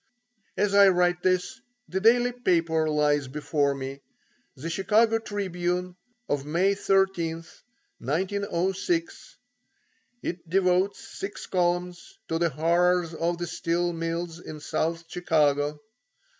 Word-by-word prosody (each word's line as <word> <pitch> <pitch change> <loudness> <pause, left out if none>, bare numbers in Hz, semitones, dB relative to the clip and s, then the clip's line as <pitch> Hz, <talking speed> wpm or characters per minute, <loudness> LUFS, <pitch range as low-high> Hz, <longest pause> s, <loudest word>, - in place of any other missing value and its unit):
As 205 0 +1
I 200 0 +8
write 175 -1 +2
this, 185 +9 0 0.3
the 190 - -2
daily 240 +4 +4
paper 165 -9 +1
lies 150 -2 +2
before 145 0 0
me; 135 +1 -6 0.5
the 150 - -7
Chicago 220 +6 +2
Tribune 180 -4 -3 0.3
of 145 -1 -1
May 175 +7 +2
13th, 190 -5 0 0.4
1906. 190 - -2 0.9
It 170 -1 -5
devotes 185 +1 +1
six 200 +1 -7
columns 180 - -1
to 165 - 0
the 170 -1 +2
horrors 170 +3 +2
of 170 +1 -1
the 175 - -3
steel 175 0 -1
mills 165 0 -3
in 155 -3 -9
South 165 +3 -2
Chicago. 150 -4 +1
175 Hz, 115 wpm, -26 LUFS, 160-195 Hz, 0.9 s, I